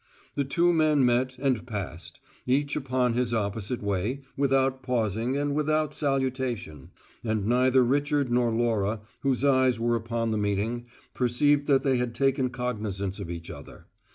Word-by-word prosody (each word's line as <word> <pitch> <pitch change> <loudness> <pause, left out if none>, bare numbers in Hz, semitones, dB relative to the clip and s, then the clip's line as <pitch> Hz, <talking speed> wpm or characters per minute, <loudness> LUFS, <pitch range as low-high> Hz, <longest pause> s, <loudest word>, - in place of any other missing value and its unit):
The 140 - 0
two 175 +5 +2
men 155 -4 +3
met 125 +1 +1
and 130 -4 0
passed, 95 -6 -6 0.3
each 140 +3 +1
upon 130 -4 0
his 120 -1 0
opposite 105 +2 -2
way, 100 +7 -1
without 135 -1 +1
pausing 120 0 -1
and 145 0 0
without 155 0 0
salutation, 130 - -2 0.3
and 110 -3 -1
neither 125 +2 +4
Richard 145 0 +1
nor 120 -1 +2
Laura, 115 -2 0 0.2
whose 135 -1 0
eyes 130 -4 +3
were 120 0 +1
upon 115 0 -2
the 110 - 0
meeting, 105 +4 -1 0.3
perceived 140 +4 +2
that 135 -2 +3
they 135 -2 +2
had 125 -1 -2
taken 135 -1 +1
cognizance 105 -6 -3
of 95 -4 -6
each 85 -1 -6
other. - - -12
125 Hz, 155 wpm, -27 LUFS, 110-135 Hz, 0.3 s, neither